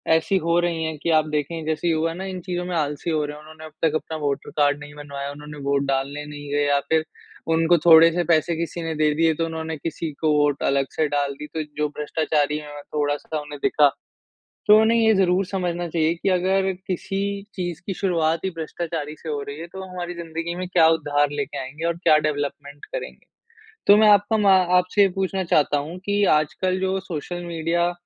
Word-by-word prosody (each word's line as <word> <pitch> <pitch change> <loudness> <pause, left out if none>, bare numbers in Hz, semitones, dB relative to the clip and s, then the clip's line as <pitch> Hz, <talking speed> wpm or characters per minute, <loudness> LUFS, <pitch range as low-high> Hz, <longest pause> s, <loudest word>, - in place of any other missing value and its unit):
ऐसी 165 +4 +1
हो 170 0 +1
रही 170 -2 -1
हैं 160 -1 -3
कि - - 0
आप 155 -1 +4
देखें, 150 +2 -2
जैसे 160 +2 -1
युवा 165 0 +1
ना 185 +3 -6
इन 190 -1 -5
चीज़ों 180 0 -3
में 180 -1 -3
आलसी 150 0 -2
हो 155 -2 +1
रहे 150 0 -6
हैं। 150 - -12
उन्होंने 155 0 -12
अब 155 - -11
तक 160 -2 +2
अपना 160 0 -3
वोटर 145 -2 -2
कार्ड 145 -1 +3
नहीं 145 0 -10
बनवाया, 140 -1 -6
उन्होंने 150 +1 -10
वोट 140 0 +2
डालने 140 +2 -2
नहीं 145 -1 -9
गए 145 0 +2
या 140 0 +3
फिर 160 -1 +3 0.5
उनको 165 +1 +4
थोड़े-से 165 +1 +7
पैसे 165 0 +2
किसी 170 +1 -4
ने 165 -1 -3
दे 150 0 +2
दिए, 165 +1 +3
तो 165 +2 -1
उन्होंने 160 -1 -4
किसी 160 +1 -4
को 155 -1 +3
वोट 145 -1 +1
अलग 135 0 +2
से 155 - +1
डाल 145 -1 -1
दी। 150 - -6
तो 160 - -2
जो 150 0 +1
भ्रष्टाचारी 150 0 0
हैं 145 -1 -8
थोड़ा-सा, 145 +1 -1
उन्हें 145 -1 -8
दिखा। 145 -1 +4 0.8
तो 210 +1 +8
उन्हें 230 +1 +3
ये 220 -1 +4
ज़रूर 190 0 +2
समझना 175 -2 -2
चाहिए 160 0 +1
कि 175 +3 -2
अगर 190 +1 +2
किसी 195 +1 -3 0.3
चीज़ 175 -3 -4
की 195 - -2
शुरुआत 165 -4 0
ही 190 - 0
भ्रष्टाचारी 160 -1 -4
से 160 - -9
हो 145 -1 -2
रही 140 +1 -7
है, 165 - -6
तो 190 +2 -9
हमारी 180 -1 -6
ज़िंदगी 165 0 -5
में 180 +1 -4
क्या 165 -3 +5
उद्धार 145 -3 +1
लेके 145 -1 -4
आएँगे 135 +4 -6
और 170 - 0
क्या 170 -3 +4
डेवलपमेंट 145 0 -5
करेंगे? - - -7 0.6
तो 205 +1 +8
मैं 215 - +6
आपका 205 +2 +4
मा 200 -2 +5 0.2
आपसे 180 +3 +2
ये 200 - +6
पूछना 190 0 -2
चाहता 150 -3 +2
हूँ 155 +5 -5
कि 205 0 +1 0.2
आजकल 185 +5 -2
जो 190 0 0
सोशल 175 0 -6
मीडिया 170 +1 0
160 Hz, 210 wpm, -23 LUFS, 150-175 Hz, 0.8 s, तो